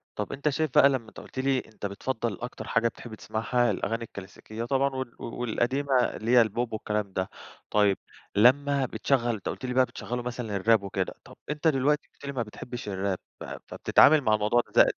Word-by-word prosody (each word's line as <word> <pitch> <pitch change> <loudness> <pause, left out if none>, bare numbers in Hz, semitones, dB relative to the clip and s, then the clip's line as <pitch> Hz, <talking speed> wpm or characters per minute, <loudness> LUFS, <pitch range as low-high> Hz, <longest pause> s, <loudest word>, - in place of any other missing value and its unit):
طب، 105 - -3
أنت 140 +2 0
شايف 155 0 -1
بقى 140 - +8
لما 130 -5 -2
أنت - - -12
قُلت 130 - -8
لي 135 -1 +2
أنت 110 -3 -9
بتفضّل 115 +1 -2
أكتر 120 - -6
حاجة 115 0 +2
بتحب 115 -1 -8
تسمعها 120 +3 0
الأغاني 115 +1 -2
الكلاسيكية 110 +2 -8
طبعًا، 135 +1 +2
وال 130 -2 -4
والقديمة 125 +4 -1
اللي 115 -1 0
هي 125 - +8
البوب 115 +1 -1
والكلام 105 -2 -2
ده. 95 0 -1 0.4
طيب، 105 -2 +3 0.4
لما 135 +5 +4
بتشغّل، 120 -2 0
أنت 100 - -5
قُلت 130 - -5
لي 125 - -2
بقى 130 0 +5
بتشغّلوا 120 +1 -5
مثلًا 120 -4 -4
الراب 110 +1 +3
وكده، 95 -1 -2
طب - - -14
أنت 150 +2 0
دلوقتي 145 +1 +2
قُلت - - -13
لي 140 - -3
ما 125 -4 -1
بتحبش 120 +1 -8
الراب، 95 -1 -1 0.2
ف - - -7 0.2
فبتتعامل 155 0 +5
مع 110 -4 +2
الموضوع 105 +3 +2
ده - - +8
120 Hz, 190 wpm, -27 LUFS, 105-130 Hz, 0.4 s, بقى